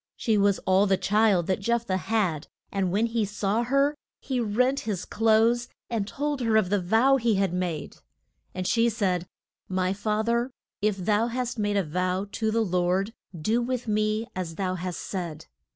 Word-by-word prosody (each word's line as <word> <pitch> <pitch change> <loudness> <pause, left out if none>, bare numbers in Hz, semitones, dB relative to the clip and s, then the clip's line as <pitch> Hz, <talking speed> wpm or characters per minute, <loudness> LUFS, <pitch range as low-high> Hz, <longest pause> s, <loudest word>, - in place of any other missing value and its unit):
She 225 -3 +1
was 200 -1 +3
all 190 +2 +4
the 190 -1 +3
child 210 -4 +3
that 185 +2 0
Jeph 235 +3 0
thah 185 - 0
had, 185 -4 -1 0.2
and 195 -3 0
when 210 +5 +2
he 230 -1 0
saw 210 +2 0
her 275 +4 +2 0.3
he 260 -2 -2
rent 250 +5 +1
his 205 -5 -3
clothes 225 +2 +3 0.2
and 215 -4 -1
told 290 +2 -2
her 225 -2 +3
of 195 -4 +1
the 205 -2 +2
vow 225 +9 +4
he 235 -4 +1
had 195 -2 +1
made. 180 -4 -3 0.6
And 185 0 -3
she 230 +4 +3
said, 185 -6 -1 0.4
My 185 0 0
fath 215 +2 -1
er, 235 +2 +1 0.3
if 210 -1 +1
thou 210 +4 +1
hast 245 0 -3
made 205 -1 +1
a 200 - +2
vow 180 +4 -1
to 220 +1 -1
the 225 +1 +1
Lord, 185 +3 0 0.3
do 220 +10 +1
with 250 0 -2
me 215 +1 +1
as 175 -3 -4
thou 185 0 -1
hast 180 -1 -4
said. 170 -5 -5
210 Hz, 185 wpm, -26 LUFS, 185-230 Hz, 0.6 s, all